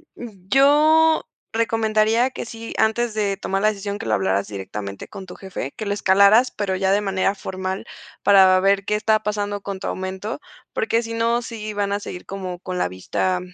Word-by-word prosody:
Yo 285 - +3 0.3
recomendaría, 225 +1 +2
que - - -6
sí, 225 0 -8
antes 220 +1 +1
de 205 -2 -1
tomar 195 0 -2
la 215 - +4
decisión, 205 -1 -4
que - - -6
lo 110 - 0
hablaras 95 0 +1
directamente 100 0 -6
con 195 -2 -9
tu 180 - -10
jefe, 190 -8 -6
que 215 - -5
lo 200 - 0
escalaras, 200 +5 +5
pero 200 -2 -2
ya 190 0 +1
de 200 +1 +3
manera 195 -1 0
formal 190 0 -5 0.4
para 190 -2 +6
ver 195 0 +2
qué 210 - 0
está 215 0 +2
pasando 205 -1 -2
con 195 -1 -5
tu - - -5
aumento. 190 +5 -4 0.3
Porque 225 +1 +1
si 230 0 -5
no, 230 +1 +1
sí 220 -2 -6
van 205 -1 -1
a 200 - -1
seguir 180 -3 -8
como 185 -2 -6
con 185 0 -5
la - - +1
vista 95 - -1
200 Hz, 190 wpm, -22 LUFS, 190-220 Hz, 0.4 s, para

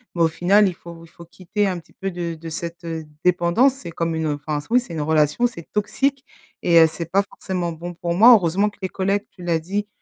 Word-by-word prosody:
mais 170 - -1
au - - +5
final, 190 +6 +3
il 185 - -2
faut 170 -1 -12
il - - -18
faut 170 +1 -14
quitter 185 +4 -3
un 185 -3 -1
petit 160 - -21
peu 195 0 -4
de 170 -1 -4
de 165 +1 -9
cette, 170 +2 -6
heu, 160 -1 -5 0.2
dépendance, 180 +9 +3
c'est 175 -11 -9
comme 165 0 -2
une, 160 0 -2
heu, 145 -1 -1
enfin 150 -1 -1
oui, 250 +1 +4
c'est 185 - -10
une 160 - -3
relation, 155 +9 +2
c'est 170 -9 -11
toxique 265 +6 -1 0.4
et 170 -1 +5
heu, 160 - +7
c'est 165 0 -6
pas 200 +2 +2
forcément 180 -3 -4
bon 175 +2 -7
pour 170 0 -3
moi. 230 +6 +8
Heureusement 195 +1 +3
que 205 - -21
les 190 - -2
collègues, 195 +2 -1
tu 180 - -13
l'as 170 -2 +1
dit, 200 +5 -3
175 Hz, 250 wpm, -22 LUFS, 165-200 Hz, 0.4 s, moi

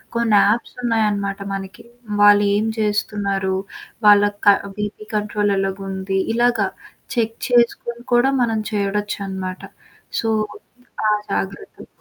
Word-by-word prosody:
కొన్ని 235 -3 +2
యాప్స్ 225 +4 0
ఉన్నాయనమాట 210 -4 0
మనకి. 195 -1 -7 0.4
వాళ్ళు 205 0 +7
ఏం 210 +2 +1
చేస్తున్నారు? 205 -3 -1 0.5
వాళ్ళకి 205 0 +5
క 200 - +9 0.2
బీపి 210 0 -5
కంట్రోల్ 210 0 0
ఎలాగుంది. 195 0 -2 0.2
ఇలాగ 240 0 +3 0.6
చెక్ 225 -1 0
చేసుకొని 235 0 +1
కూడా 245 +3 +4
మనం 225 -2 +1
చూడొచ్చనమాట. 200 -2 -3 0.6
సో, 225 - -1 0.8
ఆ - - +4 0.2
జాగ్రత్తలు 195 - -4
205 Hz, 105 wpm, -20 LUFS, 195-225 Hz, 0.8 s, క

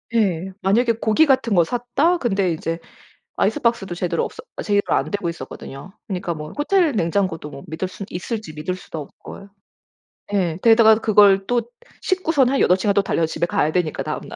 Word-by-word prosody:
예. 190 -4 +1
만약에 230 +5 +2
고기 225 +7 +3
같은 260 -6 +2
거 175 -3 +5
샀다. 245 - 0
근데 195 - 0
이제 165 +1 -3 0.6
아이스박스도 235 - 0
제대로 170 -1 -1
없어 - - -8 0.2
제대로 205 -1 +2
안 - - 0
되고 200 -4 -2
있었거든요. 150 +1 -8
그니까 180 -4 -3
뭐 150 0 -8
호텔 330 +2 +2
냉장고도 170 - -1
뭐 140 -1 -10
믿을 160 +4 -3
순 195 +1 -8
있을지 180 -2 -5
믿을 155 +4 -3
수도 165 -3 -8
없고요. 195 +7 -11 0.8
예. 175 -4 0
게다가 225 -1 +6
그걸 205 -3 +4
또 245 -1 +2 0.4
싣고선 325 -9 +1
한 275 - +1
8 180 - +4
시간 200 +1 +1
또 200 - +3
달려서 170 -4 0
집에 160 +1 -1
가야 155 -2 0
되니까 175 -3 -1
다음날. - - -6
195 Hz, 370 characters per minute, -21 LUFS, 170-235 Hz, 0.8 s, 게다가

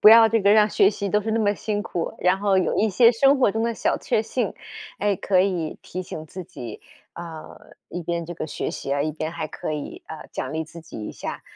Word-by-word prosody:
不 210 - +9
要 225 0 +9
这 225 -1 +2
个 200 +1 +5
让 215 0 +5
学 195 - +5
习 200 -1 -3
都 210 +2 +2
是 220 +1 -2
那 225 - +2
么 205 -1 +3
辛 210 0 -2
苦， 170 -5 -3
然 180 +1 +3
后 200 -1 +2
有 185 - +1
一 220 - +3
些 230 +4 +6
生 270 +4 +4
活 250 - +4
中 225 +2 -1
的 235 -1 0
小 - - +1
确 215 - +1
幸。 230 -2 -2 0.5
诶， 205 -2 +2
可 185 0 +2
以 180 -5 0
提 185 +1 -5
醒 160 -3 -7
自 180 +4 -8
己， 120 -8 -8 0.3
呃， 165 -2 -9 0.3
一 175 - -5
边 170 0 -2
这 175 - -6
个 155 - -4
学 - - -3
习 140 - -4
啊， 140 0 +1
一 155 - 0
边 155 +1 -4
还 155 -2 -4
可 155 - -4
以， 150 -1 -6
呃， 160 - -9
奖 130 +2 -4
励 160 0 -1
自 165 +2 -11
己 160 - -9
一 - - -5
下。 - - -6
190 Hz, 270 characters per minute, -24 LUFS, 160-215 Hz, 0.5 s, 不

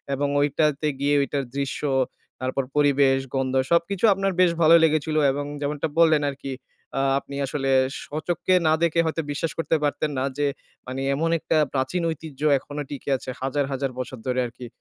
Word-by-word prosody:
এবং 145 +1 0
ঐটাতে 150 +1 +1
গিয়ে 145 +1 +2
ওইটার 140 0 -1
দৃশ্য, 140 -1 -2 0.6
তারপর 130 +1 -1
পরিবেশ, 140 -2 +4 0.2
গন্ধ 135 0 0 0.2
সবকিছু 175 +5 +2
আপনার 195 0 0
বেশ 175 -2 +5
ভালোই 165 +1 +7
লেগেছিল। 155 0 0 0.2
এবং 145 +1 -3 0.2
যেমনটা 145 +2 -1
বললেন 160 -3 +5
আরকি, 135 0 -7 0.5
আ - - +2 0.2
আপনি 140 - -10
আসলে 135 0 -1 0.3
স্বচক্ষে 160 +4 -1
না 155 - +5
দেখে, 170 0 +2
হয়তো 160 +1 -1
বিশ্বাস 155 +3 -2
করতে 165 0 +1
পারতেন 145 +1 0
না - - 0
যে, 145 -1 +1 0.4
মানে 130 +1 -4
এমন 165 +3 0
একটা 155 - 0 0.2
প্রাচীন 135 +7 -1
ঐতিহ্য 150 -3 -9 0.2
এখনো 145 +2 -6
টিকে 140 0 -6
আছে? 130 - -9
হাজার, 135 +1 0
হাজার 135 0 -2
বছর 130 0 -5
ধরে 125 0 0
আরকি। 120 +1 -10
145 Hz, 170 wpm, -24 LUFS, 135-160 Hz, 0.6 s, ভালোই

